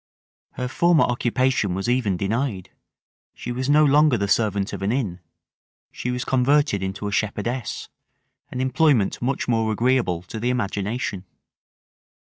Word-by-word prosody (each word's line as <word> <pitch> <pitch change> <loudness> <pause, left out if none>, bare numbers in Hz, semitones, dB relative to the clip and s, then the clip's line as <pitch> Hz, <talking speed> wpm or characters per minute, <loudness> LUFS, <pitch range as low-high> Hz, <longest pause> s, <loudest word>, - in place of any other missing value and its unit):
Her 125 - -3
former 170 +4 +3
occupation 120 -4 0
was 95 +4 -3
even 120 -7 +1
denied: 105 0 -2 0.6
she - - -6
was 130 +2 -3
no 150 +1 +5
longer 145 -2 +4
the 100 -1 -1
servant 100 -2 0
of - - -5
an 100 +2 0
inn. 110 -9 -2 0.7
She 125 - -5
was 125 +1 -2
converted 135 -4 +2
into 95 +2 -4
a - - -3
shepherdess, 110 +3 -2 0.6
an 125 - -4
employment 130 -5 +2
much 130 +2 -1
more 115 -2 +1
agreeable 115 -6 +1
to 110 +4 -7
the 120 +3 -1
imagination. 105 -3 -2
120 Hz, 140 wpm, -23 LUFS, 100-130 Hz, 0.7 s, no